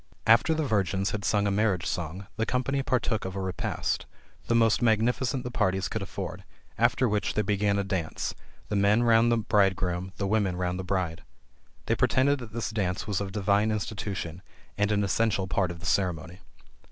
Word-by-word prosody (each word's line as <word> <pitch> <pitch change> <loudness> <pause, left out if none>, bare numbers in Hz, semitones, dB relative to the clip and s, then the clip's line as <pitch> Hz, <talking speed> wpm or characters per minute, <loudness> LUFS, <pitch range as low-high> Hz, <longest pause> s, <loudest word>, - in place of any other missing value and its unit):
After 115 +8 +5
the 155 -1 0
virgins 100 -4 0
had 105 -2 -4
sung 105 0 +2
a 100 - +1
marriage 100 -3 +1
song, 90 +3 -3
the 110 - -1
company 135 +2 0
partook 120 -3 0
of 95 0 -5
a - - -3
repast, 95 -1 -2 0.4
the 115 - +2
most 115 -1 +3
magnificent 120 +3 +1
the 125 - -5
parties 95 -4 0
could 110 - -4
afford; 95 - -6 0.3
after 130 - +2
which 105 -1 -1
they 105 - +2
began 100 0 +1
a 100 - +1
dance, 95 -5 -3 0.4
the 105 - -1
men 100 +4 +3
round 115 0 +4
the 115 - +3
bridegroom, 95 -4 +1
the 100 - -1
women 100 -3 +1
round 90 0 -2
the - - -3
bride. 90 -3 -2 0.6
They - - +1
pretended 140 +2 +2
that 120 -3 -9
this 115 0 -3
dance 95 -4 -1
was 105 -2 -1
of 100 -1 -4
divine 100 +1 +2
institution 100 -5 -4 0.3
and 105 0 +1
an 105 -1 +2
essential 100 0 +1
part 95 -1 0
of 85 0 -7
the - - -8
ceremony. 90 -2 -1
100 Hz, 190 wpm, -27 LUFS, 95-110 Hz, 0.6 s, After